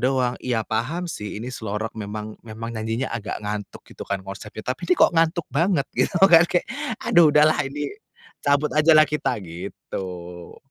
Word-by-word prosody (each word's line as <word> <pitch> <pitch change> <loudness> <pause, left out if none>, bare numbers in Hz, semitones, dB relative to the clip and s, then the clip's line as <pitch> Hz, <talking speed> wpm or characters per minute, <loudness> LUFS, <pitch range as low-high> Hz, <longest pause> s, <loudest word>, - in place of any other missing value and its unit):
doang. 130 -2 +2
Iya, 115 -4 -1
paham 130 +11 -2
sih 105 -10 -6
ini 120 +4 -6
slow 105 -4 -4
rock 110 +1 -4
memang 105 0 -6
memang 115 0 -7
nyanyinya 110 +3 -2
agak 110 -3 -4
ngantuk 105 0 -5
gitu - - -10
kan 100 -1 -1
konsepnya, 105 +2 -8
tapi 130 +5 -3
kok - - +5
ngantuk 165 0 +2
banget 165 -1 +2
gitu. - - +1
Gak 170 -2 +7
kayak 175 - +1 0.4
aduh 175 -9 +6
udahlah 150 +1 +5
ini 145 +1 -4 0.5
cabut 145 +1 +2
ajalah 155 0 +6
kita, 150 - -1
gitu. 90 0 -7
120 Hz, 160 wpm, -23 LUFS, 105-155 Hz, 0.5 s, Gak